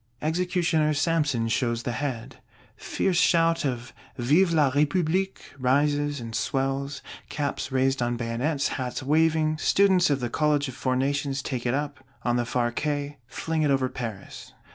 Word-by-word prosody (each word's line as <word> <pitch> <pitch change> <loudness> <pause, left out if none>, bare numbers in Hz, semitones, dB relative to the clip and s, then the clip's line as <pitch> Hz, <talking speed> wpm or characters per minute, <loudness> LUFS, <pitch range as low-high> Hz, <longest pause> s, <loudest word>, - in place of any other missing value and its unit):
Executioner 160 -2 +1
Samson 145 -6 +1
shows 120 0 0
the 125 - -2
Head: 125 -3 -4 0.4
fierce 185 -3 0
shout 165 -1 +3
of 125 -2 -3 0.2
Vive 155 +9 +3
la 150 -5 +3
République 170 +6 +1 0.2
rises, 145 +2 +1
and 115 -1 -6
swells; 135 +1 -2 0.3
caps 145 -2 -3
raised 135 0 +1
on 120 0 0
bayonets, 125 +5 -1
hats 125 0 -3
waving: 155 +1 +2
students 190 -1 +4
of 140 -2 +1
the 120 - -2
College 150 -2 +1
of 130 - -6
Four 130 0 -1
Nations 140 +1 -1
take 125 -2 -3
it 120 - +1
up, 145 -2 -4 0.2
on 120 -1 +1
the 120 -1 0
far 120 -1 0
Quais; 145 +2 -2
fling 160 +5 -2
it 150 - +2
over 135 -2 +2
Paris. 110 -7 -7
140 Hz, 155 wpm, -26 LUFS, 125-155 Hz, 0.4 s, students